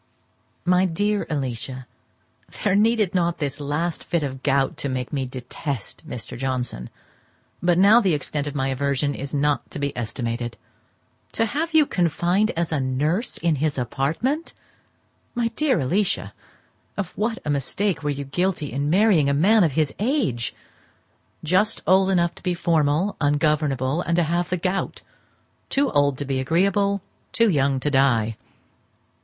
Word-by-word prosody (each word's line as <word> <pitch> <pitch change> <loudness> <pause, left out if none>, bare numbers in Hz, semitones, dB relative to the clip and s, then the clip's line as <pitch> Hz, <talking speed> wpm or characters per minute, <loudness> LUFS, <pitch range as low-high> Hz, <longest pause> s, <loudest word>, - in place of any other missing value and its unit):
My 180 +1 +4
dear 205 +4 0
Alicia,—There 130 - -5
needed 215 -2 +3
not 175 -2 +1
this 145 -1 -3
last 150 +4 -2
fit 170 -3 -1
of 140 -2 -2
the 135 - -10
gout 135 0 +1
to 140 - -2
make 130 +2 -3
me 135 -2 -1
detest 130 0 -6
Mr. 125 +2 -6
Johnson, 125 - -3 0.7
but 175 -1 +3
now 205 +6 +7
the 185 -7 +2
extent 145 0 -3
of 145 - -5
my 135 -1 0
aversion 140 +1 0
is 140 +1 -5
not 145 0 0
to - - -6
be 140 -1 -2
estimated. 120 0 -3 0.8
To 225 - +1
have 320 +8 -2
you 310 -2 +7
confined 180 - +1
as 170 -1 -1
nurse 150 - -1
in 165 -3 +1
his 150 0 0
apartment! 160 - -1 0.8
My 235 -1 +1
dear 260 - +1
Alicia, 185 +9 0 0.6
of 200 -4 -2
what 225 +2 -1
a 150 - 0
mistake 165 +7 0
were 150 - -2
you 140 -1 -3
guilty 175 +1 -1
in 140 +4 -1
marrying 180 -5 +4
a 140 - +2
man 200 +8 +5
of 160 -5 +1
his 155 -1 +1
age! 205 - 0 0.9
just 190 +7 +1
old 190 +1 +4
enough 175 -2 +2
to - - -15
be 180 -1 -1
formal, 165 +2 +1
ungovernable, 145 -1 +1
and 170 -1 0
to 175 - +3
have 170 +2 -1
the 180 - 0
gout; 185 +2 -2 0.7
too 275 0 +1
old 145 -2 +2
to 145 - -4
be 135 -1 -1
agreeable, 195 +7 +1 0.3
too 230 -3 +3
young 140 -3 +2
to 145 +3 -1
die. 120 -5 +2
155 Hz, 155 wpm, -23 LUFS, 135-190 Hz, 0.9 s, now